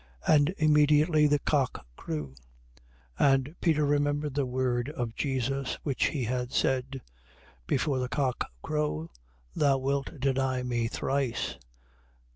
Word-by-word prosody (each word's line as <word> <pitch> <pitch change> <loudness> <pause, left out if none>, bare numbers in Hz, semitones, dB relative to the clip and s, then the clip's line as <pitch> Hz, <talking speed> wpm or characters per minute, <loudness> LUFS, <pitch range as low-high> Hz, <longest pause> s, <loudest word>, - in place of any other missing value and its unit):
And 150 +1 +4
immediately 150 0 +4
the 145 0 +3
cock 140 - -1
crew. 75 -2 -5 0.9
26:75. 140 - +5
And 135 +4 -3
Peter 155 -3 +2
remembered 145 0 0
the 140 -2 0
word 125 0 -1
of 120 -7 -4
Jesus 135 0 -2
which 140 -4 0
he 140 -5 -1
had 125 +1 -2
said: 130 0 0 0.7
Before 135 0 +1
the 125 0 -2
cock 130 -3 -1
crow, 150 - -2 0.4
thou 140 -2 +3
wilt 140 +3 -2
deny 130 -1 0
me 120 -2 -1
thrice. 135 0 -2
135 Hz, 125 wpm, -28 LUFS, 125-145 Hz, 0.9 s, 26:75